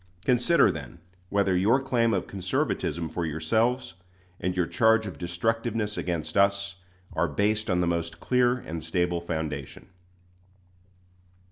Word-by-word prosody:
Consider, 125 +7 +4
then, 75 0 -8 0.3
whether 100 -2 +2
your 105 +9 +4
claim 125 -4 +1
of 95 -4 0
conservatism 90 -3 -2
for 85 +2 -3
yourselves, 110 - 0 0.5
and 90 +1 -2
your 90 - +3
charge 110 +3 +3
of 90 -8 -7
destructiveness 105 +4 -1
against 85 -3 -3
us, 100 -1 +2 0.4
are - - +1
based 105 +1 0
on 90 -1 +2
the - - +2
most 85 -1 -2
clear 125 -1 +3
and 85 -10 -6
stable 85 +1 0
foundation. 80 -5 -5
95 Hz, 130 wpm, -27 LUFS, 85-115 Hz, 0.5 s, Consider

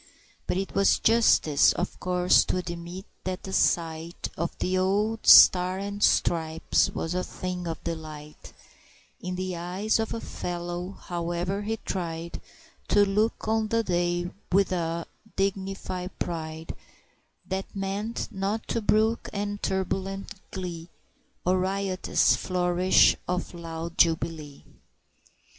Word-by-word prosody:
But - - 0
'twas 195 - +3
justice, 225 -10 +4
of 180 - -4
course, 180 0 +4
to - - -1
admit 175 +1 -6 0.2
that 185 0 -4
the 190 - -6
sight 165 -1 0
Of 170 +1 -3
the 185 - -1
old 210 +4 0
Stars 185 +1 +8
and 200 0 -5
Stripes 160 -4 +2
was 165 - -3
a 180 0 -1
thing 180 -1 -5
of 165 -1 -5
delight 155 -2 -7 0.7
In 180 0 -4
the 185 0 -3
eyes 185 +6 -1
of 220 - -1
a - - -3
fellow, 175 -1 -5
however 175 +3 -2
he 220 +2 -2
tried 170 -4 -4 0.5
To 205 - +5
look 210 +3 0
on 220 0 +1
the 230 +1 +1
day 175 -1 0 0.2
with 195 +1 +3
a 170 -2 -2 0.3
dignified 195 -1 -3
pride 160 -1 -4 0.7
That 190 +2 -4
meant 200 +4 -3
not 200 +3 -2
to 230 - 0
brook 220 +2 +2
any 205 0 -3
turbulent 195 +1 -2 0.2
glee, 175 -3 -6 0.6
Or 185 +1 +3
riotous 190 0 +1
flourish 180 0 +3
of 180 0 -2
loud 165 0 -6
jubilee! 160 -3 +1
180 Hz, 125 wpm, -27 LUFS, 170-195 Hz, 0.7 s, Stars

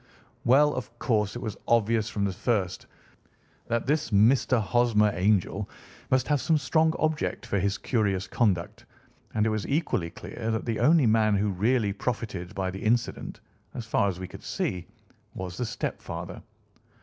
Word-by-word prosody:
"Well, 145 +4 +5
of 120 -1 -6
course 105 -4 0
it 120 - -5
was 110 -3 -4
obvious 115 -1 +2
from 100 -2 -1
the 95 - -1
first 100 -3 -1 0.8
that 115 0 -1
this 150 +2 0
Mr. 120 +4 +4
Hosmer 110 -1 +3
Angel 95 +1 +1 0.4
must 130 -1 +2
have 145 -3 +2
some 160 - +3
strong 160 +3 +2
object 155 -1 -1
for 100 - 0
his 100 +1 0
curious 100 -7 0
conduct, 95 -8 0 0.5
and 105 -1 +2
it - - +2
was 110 -1 -2
equally 140 - 0
clear 110 - -6
that 110 -1 -1
the 115 -2 -2
only 155 -2 +5
man 110 -1 +3
who 100 +1 +1
really 105 +2 +1
profited 105 -5 -4
by 95 -1 -1
the 95 - -7
incident, 120 +2 -1 0.3
as 120 - -5
far 100 -2 +2
as 90 -2 -5
we 95 - -5
could - - -11
see, 90 -2 -3 0.5
was 90 -1 -5
the 125 - -2
stepfather. - - -5
110 Hz, 165 wpm, -27 LUFS, 100-125 Hz, 0.8 s, Well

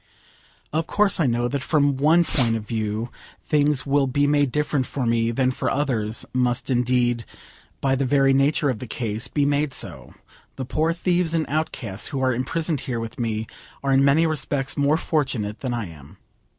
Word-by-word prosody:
Of 160 +1 0
course 205 -2 +3
I 155 - +3
know 120 0 +1
that 140 +2 -2
from 145 -2 +2
one 155 +6 +4
point 120 -8 +3
of 110 -2 -5
view 110 +1 -3 0.3
things 150 -2 +1
will 140 -1 +2
be 145 +2 +1
made 145 -2 +2
different 145 -1 0
for 135 -3 -3
me 115 0 +1
than 130 +2 +1
for - - -2
others; 115 -6 -1
must 125 0 0
indeed, 120 -1 +1 0.6
by 135 -1 +2
the 135 +1 +1
very 135 0 +3
nature 140 +1 +2
of 115 - -5
the 125 - -7
case, 115 +1 -2
be 145 +2 0
made 145 -1 0
so. - - -6 0.4
The 130 - -5
poor 155 +6 0
thieves 175 -1 0
and 160 -1 +1
outcasts 130 -9 -3
who 140 - -4
are 130 -1 +2
imprisoned 155 +5 -1
here 120 -2 -3
with 115 +2 -7
me 110 -2 -2 0.4
are 135 - +1
in 135 0 +4
many 140 +4 +4
respects 140 -3 -2
more 145 +2 +2
fortunate 130 -11 -2
than 130 - -3
I 115 -3 -3
am. 75 -3 -14
135 Hz, 190 wpm, -23 LUFS, 120-145 Hz, 0.6 s, one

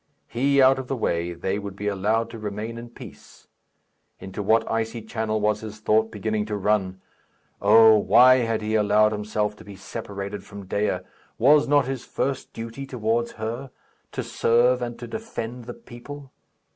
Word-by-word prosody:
He 140 +3 +1
out 135 +1 +5
of 130 - -6
the 135 - -2
way, 85 -7 -1
they 95 +4 -2
would 100 -1 -7
be 105 +1 -4
allowed 110 +3 0
to 115 - -8
remain 110 +2 -5
in 120 0 -9
peace. - - -14 0.7
Into 95 +2 -6
what 110 +3 +2
icy 115 0 -2
channel 110 -1 -2
was 105 0 0
his 110 0 -8
thought 110 +1 +2
beginning 105 0 -2
to 105 - -3
run! 95 -2 0 0.6
Oh! 110 +1 +7
why 125 +6 +6
had 115 -3 -1
he 110 +1 -2
allowed 105 0 +4
himself 105 0 -2
to - - -13
be 100 -1 -11
separated 100 +1 -6
from 100 -1 -10
Dea? 95 -1 -1 0.4
Was 145 +5 +5
not 145 -1 +4
his 130 -1 -4
first 135 0 -3
duty 115 +4 -7
towards 115 -1 -1
her? 115 +5 -5 0.4
To - - -3
serve 125 +2 +2
and 120 -1 -4
to 120 - -8
defend 125 - -6
the - - -7
people? 140 - -11
110 Hz, 170 wpm, -24 LUFS, 105-120 Hz, 0.7 s, Oh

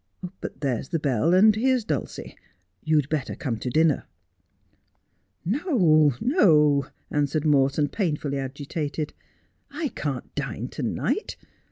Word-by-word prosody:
But - - -7
there's 130 -3 -2
the 165 - 0
bell, 145 0 +1
and 210 +3 +6
here's 255 +1 +2
Dulcie. 150 - -4 0.5
You'd 155 -2 +2
better 145 -5 -2
come 125 -6 -3
to 125 - -3
dinner.' 155 +3 +2 0.7
' - - -46 0.5
No, 180 - +3
no,' 150 - +4 0.2
answered 145 +1 0
Morton, 145 0 +3
painfully 150 -6 -2
agitated. 145 +3 -4 0.3
' - - -45
I 295 - 0
can't 140 - -5
dine - - -4
to - - -7
night. - - -2
150 Hz, 130 wpm, -25 LUFS, 140-170 Hz, 0.7 s, and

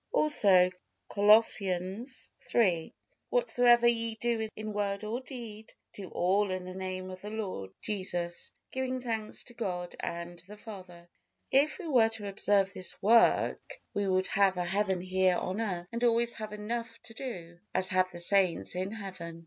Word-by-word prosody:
Also 200 - +4 0.4
Colossians 205 +2 +2 0.3
iii: 180 -9 +2 0.4
"Whatsoever 245 - +4
ye 230 -1 +1
do 225 -1 -1
in 215 0 -5
word 200 0 -2
or 220 +3 -2
deed, 230 -5 -9 0.2
do 195 -3 -8
all 195 +3 +1
in 185 -1 -3
the 185 - -7
Name 185 0 -5
of 185 0 -9
the 210 - -6
Lord 195 - -4
Jesus, 175 -4 -2 0.2
giving 260 0 -2
thanks 225 -3 -3
to 240 - -13
God 180 -6 -4
and 170 0 -5
the 195 +5 -10
Father." 185 -5 -11 0.4
If 285 +3 +3
we 380 - -8
were 240 -7 +4
to 215 -2 -4
observe 195 -1 +2
this 185 - -1
work, 235 - +3
we 205 -1 0
would 185 0 +1
have 195 -2 +3
a 180 - -1
heaven 190 0 0
here 185 0 +2
on 190 +5 -2
earth 180 -5 -3
and 235 +1 -3
always 235 0 +3
have 215 -1 -6
enough 230 +3 -4
to 225 - -8
do, 175 -10 -7 0.2
as 185 - +5
have 185 -1 +2
the 175 - -9
saints 185 0 +2
in 185 +2 -2
heaven. 185 -6 -7
200 Hz, 165 wpm, -30 LUFS, 185-230 Hz, 0.4 s, as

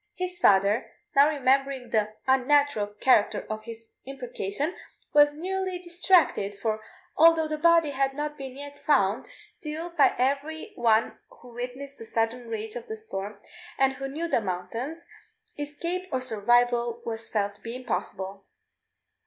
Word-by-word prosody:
His 360 -1 -4
father, 200 - +4 0.2
now 280 +2 +7
remembering 270 -3 +1
the 215 -1 +1
unnatural 265 -3 +3
character 210 +1 +2
of 215 0 -5
his 230 -1 -10
imprecation, 265 - -4 0.4
was 295 0 +7
nearly 370 +4 -3
distracted; 345 - +2
for 220 0 -1 0.3
although 325 0 +6
the 305 0 -3
body 335 -2 +5
had 270 0 0
not 295 +1 -2
yet 280 +2 -8
been - - -22
found, 220 -5 +2
still 320 +3 -7
by 325 -4 +4
every 280 +5 -1
one 230 -2 +2
who 245 -1 -16
witnessed 255 +3 -6
the 225 - -8
sudden 230 +2 -1
rage 220 -1 -4
of 240 - -7
the 220 - -5
storm 205 -2 -6 0.4
and 270 0 +3
who 270 +1 -5
knew 310 +5 -3
the 285 - +1
mountains, 225 - -4 0.5
escape 340 +6 -4
or 260 - 0
survival 240 0 +2
was 225 -1 -4
felt 200 -2 0
to 205 - -19
be 230 +1 -6
impossible. 195 -4 -4
255 Hz, 145 wpm, -27 LUFS, 220-295 Hz, 0.5 s, now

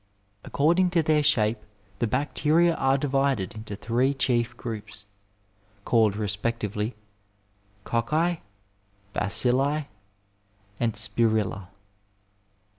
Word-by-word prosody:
According 170 +5 +2
to 165 - +4
their 155 -1 +3
shape 110 -5 +2 0.4
the 120 - +1
bacteria 150 +6 +2
are 135 -3 +1
divided 135 -7 0
into 110 -1 -7
three 125 +7 0
chief 120 -2 0
groups, 105 -3 -7 0.8
called 110 -4 +3
respectively 105 +1 -2 0.9
cocci, 155 +9 0 0.7
bacilli, 130 +8 +2 0.9
and 115 -2 0
spiriUa. 110 -5 +1
120 Hz, 85 wpm, -26 LUFS, 110-140 Hz, 0.9 s, to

